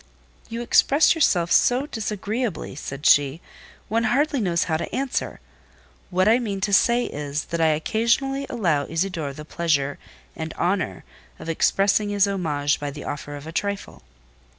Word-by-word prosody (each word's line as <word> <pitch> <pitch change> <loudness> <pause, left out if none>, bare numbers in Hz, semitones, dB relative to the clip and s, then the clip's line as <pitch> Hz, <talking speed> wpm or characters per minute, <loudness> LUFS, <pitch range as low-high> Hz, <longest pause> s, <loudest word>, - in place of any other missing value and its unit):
"You 230 +1 -4
express 285 +5 +4
yourself 180 - +2
so 250 +3 +4
disagreeably," 215 - -3
said 140 +1 -7
she, 145 +1 +4 0.5
"one 225 +2 0
hardly 275 +3 +1
knows 170 -4 +1
how 160 -2 0
to 165 - -5
answer; 270 -1 -2 0.7
what 185 +2 +2
I 230 +3 +5
mean 205 -5 -3
to 200 +1 -1
say 235 +5 +4
is, 145 +1 -4
that 170 0 -1
I 160 - +4
occasionally 270 - 0
allow 170 - 0
Isidore 165 -3 -2
the 150 +2 -9
pleasure 145 -4 -1 0.4
and 160 0 -6
honour 175 - -1 0.3
of - - -8
expressing 200 +5 +2
his 205 -1 +3
homage 150 -7 0
by 145 - -3
the 145 +1 -8
offer 145 0 -6
of 145 0 -9
a 160 - -7
trifle." 200 +3 -4
185 Hz, 155 wpm, -23 LUFS, 150-230 Hz, 0.7 s, I